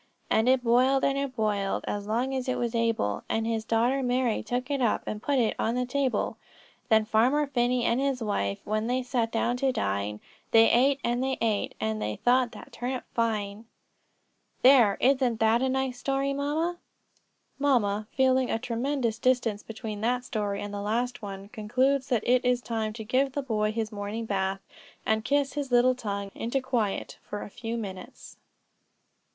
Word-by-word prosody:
'And 220 +3 +3
it 260 -1 +3
boiled, 255 +3 +3
and 275 - +2
it 275 -2 -3
boiled, 205 -3 -1
As 205 0 -3
long 245 +5 0
as 260 0 -2
it 255 - 0
was 235 -1 -1
able; 230 - 0
And 225 0 0
his 225 -1 -1
daughter 235 +5 +1
Mary 250 -2 +1
took 250 +4 -3
it 280 -2 0
up, 235 -4 +1
And 210 - -4
put 280 +2 0
it 230 -4 +2
on 230 +2 0
the 250 0 0
table. 265 0 -1 0.5
'Then 220 -1 +4
Farmer 245 +7 +3
Phinney 245 -2 +1
and 235 +2 +2
his 275 -2 0
wife, 100 - -1
When 215 +1 -1
they 255 +1 0
sat 240 -3 -1
down 240 +2 0
to 265 +1 +1
dine, 100 - -2 0.3
They 225 0 +6
ate, 275 +3 +4
and 240 +1 0
they 265 0 -1
ate, 220 -3 0
And 110 0 -2
they 105 0 -2
thought 245 -1 +2
that - - -11
turnip 250 +1 -4
fine.'" 215 -2 -1 1.0
"There, 245 -6 +6
isn't 255 -3 +2
that 225 +2 +3
a 265 - +1
nice 260 -1 -1
story, 275 0 0
mamma?" 310 +5 -1 0.8
Mamma, 215 -7 +1
feeling 260 -1 +2
a - - +1
tremendous 240 0 -2
distance 240 -5 +1
between 215 -1 -7
that 245 +2 0
story 205 -4 -2
and 205 0 -6
the 200 - -4
last 240 +5 -1
one, 195 -1 -7
concludes 255 +5 0
that 240 -5 0
it 250 +1 +4
is 250 -1 +2
time 220 -2 -2
to 220 0 -7
give 255 +4 +1
the 285 - -2
boy 215 -4 0
his 220 0 -3
morning 210 +2 -4
bath, 195 -2 -1 0.4
and 220 0 +1
kiss 280 +2 +1
his 285 -3 -4
little 245 +1 +5
tongue 200 -5 -4
into 240 +4 -1
quiet 245 -6 -2
for 205 - -6
a - - -10
few 230 +1 -4
minutes. 195 -5 -8
235 Hz, 185 wpm, -27 LUFS, 215-260 Hz, 1.0 s, They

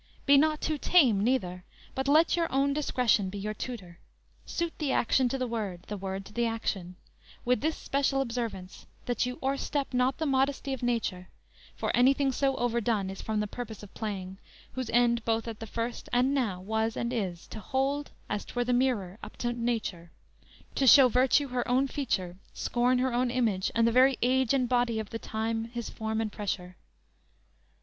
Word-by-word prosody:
Be 280 - +6
not 305 +2 +3
too 310 -2 -1
tame 250 - +4
neither, 185 -7 0 0.3
but 265 +1 -2
let 310 +4 +5
your 335 -1 0
own 275 +1 +2
Discretion 250 -9 +1
be 205 - -6
your 210 +2 -3
tutor: 200 -8 -7 0.5
suit 340 -1 -2
the 295 -4 0
action 250 +1 +2
To 270 - -2
the 255 - -1
word, 210 -7 -4
the 210 - -3
word 195 0 -5
to - - -13
the 235 +1 +1
action; 195 -5 -3 0.5
With 250 -2 +2
this 315 +2 0
special 275 0 0
observance, 230 -7 -4 0.2
that 245 0 0
you 250 +1 -5
o'erstep 275 +1 -1
Not 250 +2 +2
the 320 - -2
modesty 270 0 +1
of 265 - -5
nature; 230 -7 -1 0.5
for - - -1
anything 270 +3 +4
So 270 +1 +1
overdone 230 -5 0
is 195 - -8
from 215 -1 -1
the - - -1
purpose 220 -1 -7
of 200 - -12
playing, 190 -3 -5 0.3
Whose 255 -3 -4
end, 235 -1 +3
both 225 0 0
at 225 -2 -6
the 225 - -7
first 230 +2 -4
and 250 +3 +3
now, 225 -10 0
was 220 +3 -1
and 235 +1 -2
is, 185 -7 -3
To - - -7
hold, 270 +6 -1 0.2
as 205 0 -2
'twere, 245 0 -3
the 250 - +1
mirror 230 -7 0
up - - -10
to 240 0 -1
nature; 225 -8 -3 0.6
To 270 - +1
show 260 0 +9
virtue 265 +3 +3
her 245 -1 -2
own 260 +2 +2
feature, 190 - -2 0.2
scorn 245 +1 +1
her 255 0 0
Own 245 +1 +1
image, 225 -6 0
and 230 0 +4
the - - +3
very 255 +2 +5
age 255 -1 +2
and 260 -3 +2
body 245 -2 +1
Of 215 -2 -6
the 225 - -4
time 225 +1 -2
his 235 0 -6
form 220 0 -3
and 215 -2 -2
pressure. 185 -3 -4
240 Hz, 190 wpm, -29 LUFS, 215-265 Hz, 0.6 s, show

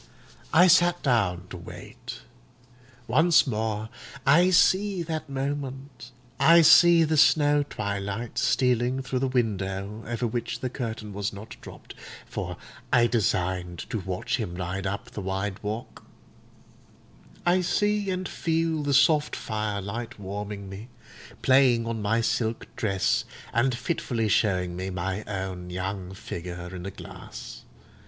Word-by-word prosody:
I 175 +3 +7
sat 175 -1 +4
down 100 -9 +1
to - - -6
wait. 85 - -10 0.8
Once 160 +5 +4
more 110 -3 -2 0.4
I 170 +7 +6
see 190 +1 +3
that 155 -2 -4
moment—I 135 +1 0
see 165 +1 +7
the 155 0 +1
snow 145 0 +5
twilight 100 -3 -4
stealing 125 +1 +1
through 130 -1 -2
the 135 - 0
window 105 -4 -2
over 120 +1 -2
which 120 +1 -3
the 130 - -3
curtain 110 -5 -5
was 100 +1 -2
not 105 +2 -10
dropped, - - -11 0.3
for - - -5 0.3
I 120 - +5
designed 90 -6 -1
to 110 - -1
watch 95 +7 -2
him 100 -8 -4
ride 90 +2 -3
up 100 +1 -5
the 105 - -6
white 95 +2 -3
walk; 110 +3 -6 1.4
I 180 +1 +4
see 205 +2 +1
and 185 -1 -2
feel 165 -1 -1
the 145 -1 +1
soft 150 +2 +4
firelight 105 +1 -4
warming 100 0 -6
me, 95 +4 -9 0.6
playing 130 -3 +4
on 115 -1 -3
my 110 +3 +1
silk 115 0 -1
dress, 110 +5 +1 0.3
and 125 +1 +2
fitfully 120 -7 -1
showing 90 -4 +1
me 95 +1 -4
my 95 +2 -3
own 95 -3 -5
young 95 +1 -4
figure 90 -2 -7
in 90 +1 -6
a - - -2
glass. - - -10
115 Hz, 135 wpm, -26 LUFS, 95-140 Hz, 1.4 s, I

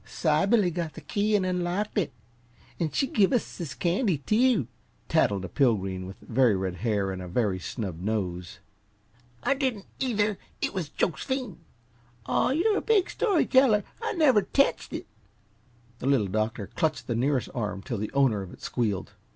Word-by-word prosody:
"Sybilly 180 +5 +2
got 165 -3 -3
the - - -8
key 210 +1 0
an' 195 -2 +2
unlocked 180 +3 -1
it, 185 - -1 0.7
an' 165 -3 +1
she 270 - +1
give 205 -7 +3
us 245 -6 -1
this 170 -5 -5
candy, 180 - +1
too!" 215 - +2 0.4
tattled 100 -2 +2
a - - -4
Pilgreen 95 -7 0
with 95 - -9
very 120 -2 +3
red 95 -1 -2
hair 100 -1 0
and 95 -1 -5
a 90 - -6
very 95 0 0
snub 95 -3 -5
nose. 90 -4 -3 0.9
"I - - +3
didn't, 260 -8 -2
either! 210 -5 0 0.2
It - - -1
was 180 -6 -3
Jos'phine!" 250 - -1 0.7
"Aw, - - +2
you 375 +10 +2
big 415 -5 +3
story 400 -8 +2
teller! 260 -6 +4 0.2
I 455 - -1
never 275 - +5
tetched 275 +8 +1
it!" - - -5 0.9
The - - -3
Little 135 -7 +3
Doctor 110 +1 -1
clutched 155 +8 -1
the 120 - -1
nearest 130 +2 0
arm 105 -6 -3
till 120 -6 -3
the 105 - -3
owner 135 -7 +3
of 95 -2 -8
it - - -14
squealed. 110 -6 -1
150 Hz, 165 wpm, -27 LUFS, -, 0.9 s, never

